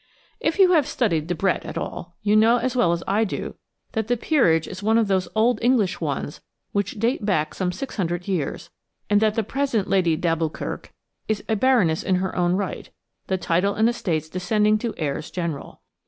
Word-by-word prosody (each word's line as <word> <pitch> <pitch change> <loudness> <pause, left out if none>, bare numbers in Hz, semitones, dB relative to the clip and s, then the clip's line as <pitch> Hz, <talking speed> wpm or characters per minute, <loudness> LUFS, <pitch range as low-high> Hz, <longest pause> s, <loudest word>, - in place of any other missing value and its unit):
If 320 +3 0
you 380 -2 +6
have 310 -6 +4
studied 170 - 0
Debrett 180 +2 0
at - - -6
all, 175 0 -6
you 210 0 +3
know 225 +3 +5
as 255 +2 -2
well 180 -9 +3
as 170 0 -1
I 205 +3 +2
do 210 - -4 0.4
that 220 -1 -2
the 245 +1 +1
peerage 180 - +2
is 185 - -7
one 220 +2 +3
of 225 -2 +2
those 190 -2 +1
old 225 +1 +3
English 230 -8 +2
ones 145 -1 -3 0.3
which 200 +1 -2
date 230 +1 0
back 155 -7 0
some 180 -2 -1
six 265 +8 -6
hundred 175 -1 -2
years, 180 -8 -3 0.4
and 205 0 +4
that 215 -1 +2
the 225 - +1
present 255 -3 -1
Lady 175 -4 +2
d'Alboukirk 165 -1 -2 0.4
is 215 -1 -1
a 220 - +1
baroness 210 -9 +3
in 185 - +1
her 185 +1 -2
own 175 0 +2
right, 195 0 -3 0.4
the 190 - 0
title 185 +3 +1
and 220 +1 +3
estates 170 -10 -1
descending 210 +5 +1
to 230 0 -3
heirs 150 -1 -3
general. 170 -6 -5
200 Hz, 195 wpm, -23 LUFS, 175-225 Hz, 0.4 s, you